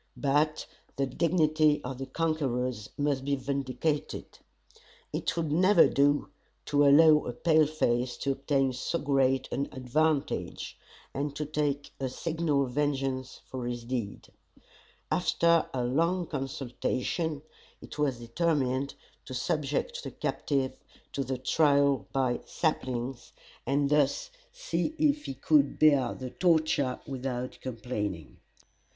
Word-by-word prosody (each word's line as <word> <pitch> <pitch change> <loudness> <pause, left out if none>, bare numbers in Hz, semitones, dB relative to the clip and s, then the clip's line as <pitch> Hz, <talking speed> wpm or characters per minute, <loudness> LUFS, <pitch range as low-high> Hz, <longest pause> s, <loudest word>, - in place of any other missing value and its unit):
But 150 +2 +1 0.3
the 135 - +1
dignity 155 +1 +2
of 125 0 -5
the 135 - -5
conquerors 130 -7 -1
must 145 -2 0
be 140 +1 +1
vindicated. 140 +2 -3 0.7
It - - -2
would 160 -3 -1
never 185 +3 +6
do 145 +1 +2 0.4
to 145 -1 +3
allow 150 +1 +6
a 120 - -3
pale 155 +3 +3
face 125 -5 0
to 140 - -1
obtain 135 -1 +1
so 130 +6 -2
great 135 -3 +1
an 140 - -2
advantage, 140 +4 -1 0.4
and 145 +1 -3
not 150 0 -4
take 145 -1 -1
a 135 -1 -2
signal 155 -1 0
vengeance 135 -1 -2
for 125 -2 -5
his 120 -1 -4
deeds. 115 -5 -4 0.8
After 170 -1 +3
a 125 -2 -1
long 165 +8 +1
consultation, 140 +2 -3 0.4
it - - -11
was 140 -4 +1
determined 135 +1 0 0.3
to 130 - -7
subject 155 - -1
the - - -5
captive 135 -3 -2 0.4
to 140 - -1
the 130 0 -3
trial 140 0 +3
by 130 -3 +1
saplings, 130 -5 -2 0.3
and 140 +1 +1
thus 150 - +2 0.2
see - - -2
if 295 -1 +2
he 135 - -5
could 140 +1 +3
bear 140 -5 +4
the 130 -1 -6
torture 155 -7 +2
without 125 -2 -4
complaining. 105 - -4
140 Hz, 125 wpm, -29 LUFS, 130-155 Hz, 0.8 s, never